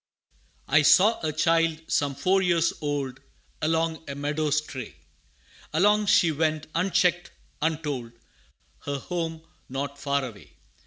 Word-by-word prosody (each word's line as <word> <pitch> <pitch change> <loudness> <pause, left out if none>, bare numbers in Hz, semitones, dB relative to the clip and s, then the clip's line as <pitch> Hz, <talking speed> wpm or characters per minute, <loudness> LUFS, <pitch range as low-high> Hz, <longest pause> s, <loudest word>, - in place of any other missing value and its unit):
I 150 +2 +5
saw 180 +9 +5
a 155 -2 -1
child 165 +1 +2
some 140 -1 0
four 190 +6 +2
years 170 -2 +2
old, 140 -3 -3 0.4
Along 160 +1 0
a 140 - -4
meadow 150 +2 -1
stray; 145 -5 -3 0.8
Alone 205 +5 +3
she 170 -3 +5
went 155 0 0
unchecked 175 0 +1 0.3
untold 150 -7 -2 0.7
Her 140 0 -2
home 165 +1 -4 0.3
not 140 +2 -4
far 140 -1 0
away. 110 -5 -11
155 Hz, 120 wpm, -26 LUFS, 140-165 Hz, 0.8 s, I